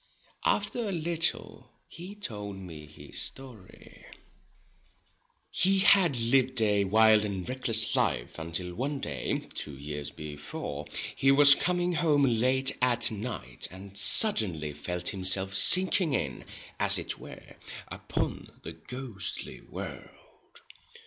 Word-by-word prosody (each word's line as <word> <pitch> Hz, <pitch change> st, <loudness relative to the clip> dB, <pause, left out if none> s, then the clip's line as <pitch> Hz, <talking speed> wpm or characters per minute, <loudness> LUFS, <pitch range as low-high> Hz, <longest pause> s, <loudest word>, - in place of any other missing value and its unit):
After 210 Hz, +2 st, 0 dB
a -, -, -2 dB
little 170 Hz, -1 st, -2 dB, 0.2 s
he 180 Hz, +5 st, -10 dB
told 105 Hz, -, -6 dB
me 80 Hz, -5 st, -10 dB
his 75 Hz, -, -7 dB
story. 125 Hz, -8 st, -9 dB, 1.5 s
He 195 Hz, +3 st, +4 dB
had 185 Hz, -9 st, +5 dB
lived 130 Hz, +2 st, +2 dB
a 105 Hz, -2 st, +2 dB
wild 110 Hz, +1 st, +5 dB
and 95 Hz, -3 st, -4 dB
reckless 115 Hz, -4 st, +2 dB
life, -, -, -1 dB
until 85 Hz, +2 st, -4 dB
one 135 Hz, +7 st, -3 dB
day, 70 Hz, -, -3 dB
two 70 Hz, -3 st, -7 dB
years 75 Hz, 0 st, -6 dB
before, 75 Hz, 0 st, -7 dB, 0.3 s
he 135 Hz, -, +2 dB
was 140 Hz, 0 st, +8 dB
coming 180 Hz, +2 st, 0 dB
home 155 Hz, -4 st, +2 dB
late 130 Hz, +2 st, +2 dB
at 120 Hz, -2 st, +3 dB
night, 105 Hz, -, -5 dB
and 95 Hz, +1 st, -12 dB
suddenly 95 Hz, -, +3 dB
felt 90 Hz, +4 st, -3 dB
himself 95 Hz, 0 st, 0 dB
sinking 180 Hz, -, +3 dB
in, 70 Hz, -, -3 dB, 0.3 s
as -, -, +5 dB
it -, -, -5 dB
were, -, -, -12 dB, 0.3 s
upon -, -, -4 dB
the 80 Hz, -, -7 dB
ghostly 115 Hz, +4 st, -7 dB
world. -, -, -11 dB
110 Hz, 120 wpm, -28 LUFS, 90-140 Hz, 1.5 s, was